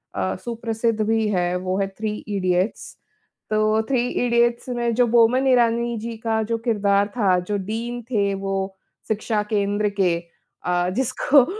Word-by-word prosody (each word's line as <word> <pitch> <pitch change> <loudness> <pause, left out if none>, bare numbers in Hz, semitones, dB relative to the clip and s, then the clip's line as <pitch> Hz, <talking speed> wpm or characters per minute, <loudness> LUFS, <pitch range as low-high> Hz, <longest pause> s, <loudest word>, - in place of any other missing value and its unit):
अ, 95 0 -1
सुप्रसिद्ध 230 -1 -1
भी 220 0 +1
है, 180 -2 0
वो 185 +1 -2
है 195 - +1
"थ्री 215 -1 -2
इडियट्स।" 185 0 -1 0.5
तो 215 +1 +2
थ्री 245 -2 +1
इडियट्स 235 0 +1
में 240 -1 0
जो 245 0 +4
बोमन 240 +3 +4
इरानी 235 -2 +2
जी 230 +1 -5
का 220 0 0
जो 230 +1 -1
किरदार 200 -3 +2
था, 190 -5 +3
जो 205 +3 -2
डीन 230 +5 -4
थे 200 -3 +1
वो 195 0 -3 0.3
शिक्षा 215 0 0
केंद्र 205 +1 +1
के 175 -2 +3 0.5
अ, 180 0 +1
जिसको 265 +1 +3
220 Hz, 150 wpm, -22 LUFS, 195-235 Hz, 0.5 s, जो